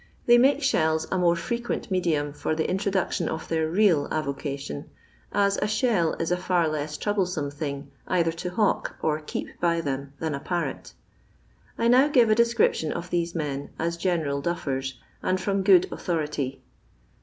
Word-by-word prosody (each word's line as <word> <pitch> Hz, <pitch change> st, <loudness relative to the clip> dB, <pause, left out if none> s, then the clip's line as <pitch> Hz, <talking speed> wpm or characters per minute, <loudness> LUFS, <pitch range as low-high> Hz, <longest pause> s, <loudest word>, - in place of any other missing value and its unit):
They 240 Hz, 0 st, +7 dB
make 275 Hz, +3 st, +4 dB
thelle 160 Hz, -, +2 dB
a 190 Hz, -, +1 dB
more 175 Hz, -1 st, +4 dB
frequent 235 Hz, +5 st, -3 dB
medium 155 Hz, -6 st, 0 dB
for 155 Hz, -, -2 dB
the 160 Hz, -, 0 dB
in 190 Hz, -, 0 dB
tiodoetion 190 Hz, -4 st, 0 dB
of 160 Hz, -, -4 dB
their 160 Hz, -1 st, 0 dB
real 175 Hz, -5 st, +3 dB
avocation, 140 Hz, -, -4 dB, 0.4 s
ae 200 Hz, 0 st, +3 dB
a 210 Hz, -, +1 dB
shell 215 Hz, -6 st, +1 dB
it -, -, -3 dB
ft 175 Hz, +2 st, 0 dB
hx 175 Hz, -3 st, +3 dB
leia 150 Hz, 0 st, -3 dB, 0.2 s
tronbleiome 180 Hz, -7 st, -1 dB
thing 140 Hz, -1 st, -5 dB, 0.2 s
either 170 Hz, -2 st, +2 dB
to 170 Hz, +2 st, -5 dB
hawk 205 Hz, +3 st, 0 dB
or 155 Hz, -1 st, +1 dB
keep 150 Hz, -, -5 dB
bj 170 Hz, -1 st, +2 dB
them 140 Hz, -1 st, -3 dB
than 160 Hz, -2 st, -2 dB
a 140 Hz, -, -3 dB
parrot 175 Hz, +4 st, -3 dB, 0.8 s
I 230 Hz, -, +1 dB
DOW 255 Hz, +4 st, +5 dB
grre 245 Hz, -7 st, +4 dB
a -, -, +5 dB
deacription 235 Hz, -9 st, +2 dB
of 175 Hz, 0 st, -5 dB
these 170 Hz, -1 st, -1 dB
men, 145 Hz, -3 st, -3 dB
as 170 Hz, +1 st, -1 dB
general 165 Hz, -5 st, -1 dB
daffsrsy 135 Hz, -5 st, -2 dB, 0.3 s
and 185 Hz, 0 st, 0 dB
from 195 Hz, +1 st, 0 dB
good 190 Hz, -2 st, +5 dB
authority. 150 Hz, -5 st, -3 dB
170 Hz, 170 wpm, -26 LUFS, 150-190 Hz, 0.8 s, They